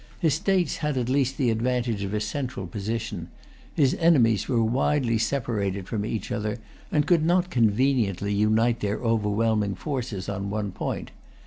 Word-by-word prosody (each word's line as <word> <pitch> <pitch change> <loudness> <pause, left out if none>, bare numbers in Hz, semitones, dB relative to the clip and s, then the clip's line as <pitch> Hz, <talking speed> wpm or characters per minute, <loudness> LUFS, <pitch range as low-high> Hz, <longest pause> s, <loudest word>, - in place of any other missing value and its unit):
His 160 -6 +2
states 180 0 +1
had 150 -3 -1
at 125 -1 -1
least 135 0 +1
the 125 -4 +2
advantage 120 -2 0
of 100 - -3
a - - +1
central 115 -1 -3
position; 105 -1 -4 0.5
his 140 -4 +3
enemies 120 - +4
were 115 -3 +2
widely 120 0 +1
separated 105 -6 -1
from 105 -3 -2
each 110 -4 -4
other, 105 +1 -2 0.3
and 150 -2 +2
could 165 0 +3
not 175 +2 +2
conveniently 110 - +2
unite 110 +3 +2
their 105 +1 -1
overwhelming 110 -2 +1
forces 125 -10 -4
on 100 0 -3
one 105 -1 -2
point. - - -4
115 Hz, 155 wpm, -25 LUFS, 105-135 Hz, 0.5 s, enemies